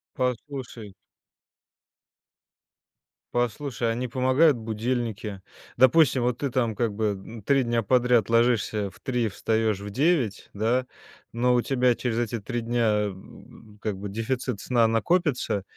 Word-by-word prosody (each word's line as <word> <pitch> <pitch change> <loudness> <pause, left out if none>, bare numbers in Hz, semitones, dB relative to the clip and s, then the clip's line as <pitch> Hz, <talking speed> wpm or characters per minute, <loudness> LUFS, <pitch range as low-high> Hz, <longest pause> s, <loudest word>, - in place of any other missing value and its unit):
Послушай 125 -4 -4 2.4
послушай, 120 0 -1
а - - -2
не 125 +2 -2
помогают 130 +5 +3
будильники? 110 -2 -3 0.3
Допустим, 130 0 +5
вот 125 0 0
ты 140 - -1
там 120 -3 0
как 115 -1 -1
бы 110 +2 -1 0.2
н 115 -2 -10
3 135 +4 +3
дня 120 -1 0
подряд 125 0 +3
ложишься 115 -3 +2
в - - -19
3, 125 -3 0
встаешь 110 0 0
в 100 - -6
9, 130 - 0
да, 115 +5 0 0.5
но 125 +2 +2
у 120 - +3
тебя 125 -1 +2
через 120 -1 -2
эти 120 0 -2
3 120 +3 -4
дня, 115 -3 +1
м, 105 +2 -13
как 105 -3 -3
бы, 100 +2 -6
дефицит 115 +1 -3
сна 120 -3 +2
накопится, 120 - 0
120 Hz, 135 wpm, -25 LUFS, 110-125 Hz, 2.4 s, Допустим